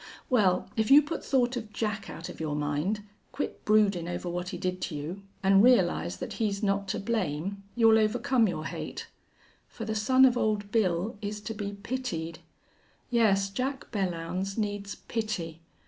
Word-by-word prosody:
Well, 190 -7 +3
if 220 0 +1
you 290 +2 +9
put 320 +3 -4
thought 255 -2 +2
of 215 -3 -6
Jack 215 -1 -3
out 165 - -7
of - - -9
your 155 -2 -2
mind 150 +8 -1 0.3
quit 290 - -4
broodin' 205 -5 +3
over 175 0 -4
what 175 +1 -3
he - - -5
did 185 0 -2
to 160 - -3
you 160 +7 -5 0.2
an' 195 0 +6
realize 185 - +3
that - - -5
he's 205 -1 0
not 200 0 +1
to - - -2
blame, 195 -3 -2
you'll 225 -2 +6
overcome 225 +2 +2
your 155 -4 -3
hate. - - -5 0.6
For 225 - -7
the 220 - -2
son 255 +5 +5
of 250 -2 +4
Old 210 -3 0
Bill 200 -1 +1
is 210 0 -4
to 220 +2 -5
be 205 -1 -4
pitied. 200 -7 -4 0.7
Yes, 200 -5 +3
Jack 265 +5 -3
Belllounds 185 0 -2
needs 205 -2 -2
pity. 180 -8 -4
205 Hz, 170 wpm, -29 LUFS, 180-225 Hz, 0.7 s, you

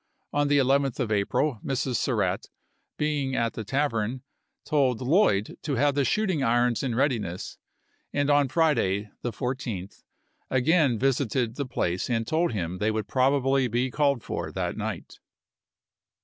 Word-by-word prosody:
On 145 0 +2
the 145 0 +3
11th 135 -1 +2
of 120 -4 -1
April 110 +5 +1
Mrs. 130 -2 -1
Surratt, 100 -7 -1 0.5
being 145 -3 -1
i865. - - -1
at 115 -1 0
the 110 - -5
tavern, 125 -1 -1 0.4
told 135 -6 +2
Lloyd 130 - +2
to 145 -3 -2
have 140 +3 +2
the 140 0 +1
shooting 185 - +1
irons 120 -1 +2
in 125 -4 -2
readiness, 115 - -1 0.5
and 145 -1 0
on 145 -1 +4
Friday, 115 - +1
the 120 - -2
14th, 120 -7 -4 0.5
again 135 -1 +3
visited 130 -2 0
the 140 -2 -3
place 90 -5 -1
and 115 -2 0
told 160 +6 +1
him 90 -4 -3
they 105 - +1
would 110 -1 -2
probably 135 0 +2
be 120 +2 -1
called 140 -5 +1
for - - -4
that - - -3
night. - - -5
130 Hz, 150 wpm, -26 LUFS, 115-140 Hz, 0.5 s, on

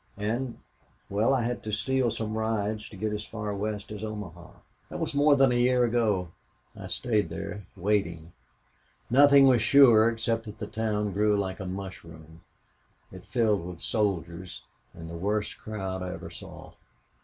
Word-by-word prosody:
And 115 +4 -2 0.5
well, 105 +6 +2
I 130 -3 +2
had 120 +1 -2
to 110 - -5
steal 130 +4 +1
some 110 -1 -3
rides 110 -1 -2
to 100 - -12
get 105 +2 -2
as 105 0 -3
far 105 -1 -5
west 105 0 -4
as 105 0 -6
Omaha. 90 -6 -7 0.4
"That - - -6
was - - -2
more 145 +1 +5
than 135 -2 +4
a - - +1
year 125 0 +3
ago. 110 -7 +1 0.5
I - - -8
stayed 110 -8 0
there 95 +4 -6
waiting. 85 -4 -1 0.8
Nothing 140 +1 +7
was 125 -4 +5
sure, 115 -2 +7
except 115 0 -1
that 105 0 -9
the 105 - -5
town 105 -1 -1
grew 105 +1 +2
like 95 -2 -3
a 95 - -5
mushroom. 85 -4 -9 0.7
It - - -12
filled 110 -6 +1
with 90 -1 -8
soldiers 90 -4 -2 0.3
and 80 -1 -9
the 85 - -8
worst 105 +5 -2
crowd 95 -3 -5
I 90 0 -4
ever - - -8
saw. - - -11
105 Hz, 165 wpm, -28 LUFS, 95-115 Hz, 0.8 s, Nothing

